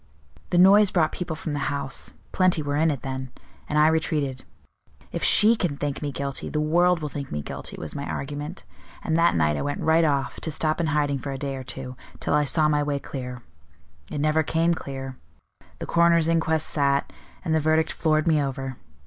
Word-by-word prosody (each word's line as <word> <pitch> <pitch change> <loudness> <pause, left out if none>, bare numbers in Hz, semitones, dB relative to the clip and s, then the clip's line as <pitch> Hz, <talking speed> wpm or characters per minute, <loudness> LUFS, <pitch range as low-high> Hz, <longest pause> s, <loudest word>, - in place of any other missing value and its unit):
The 175 - +1
noise 195 +3 +7
brought 165 -5 +2
people 175 -3 -4
from 155 -1 -5
the 145 - -2
house 140 -1 -3 0.2
plenty 185 -4 +2
were 145 0 -2
in 160 +2 +3
it 140 -4 -3
then 130 -1 -4 0.4
and 150 - 0
I 150 +1 +6
retreated. 150 -4 0 0.7
'If - - -4
she 220 +2 +6
can 175 -10 -2
think 145 -1 -3
me 145 -1 -2
guilty, 140 0 -4
the 150 - -1
world 170 +3 +3
will - - -1
think 140 -1 -6
me 75 0 -3
guilty,' - - -7
was - - -6
my 140 - -5
argument; 145 +5 -5 0.4
and 160 - 0
that 165 - +3
night 75 -2 +2
I - - -2
went 145 - -3
right 160 +1 +3
off, 140 -3 0
to - - -3
stop 155 +1 0
in 165 - 0
hiding 145 -2 0
for 140 - -5
a 135 - -4
day 135 0 -4
or 130 - -6
two, 125 0 -7 0.2
till - - -1
I 150 - +3
saw 155 +2 +3
my 150 -1 +2
way 145 -1 -1
clear. 125 -3 -7 0.7
It - - -5
never 155 +2 +2
came 165 +2 +1
clear; 135 -4 -6 0.6
the - - -6
coroner's 170 -1 +3
inquest 160 -1 +2
sat, 140 -2 +1 0.3
and 160 - 0
the 160 - +3
verdict 155 +1 +2
floored 155 0 +1
me 155 -2 +3
over. 135 -2 -4
150 Hz, 210 wpm, -25 LUFS, 140-160 Hz, 0.7 s, noise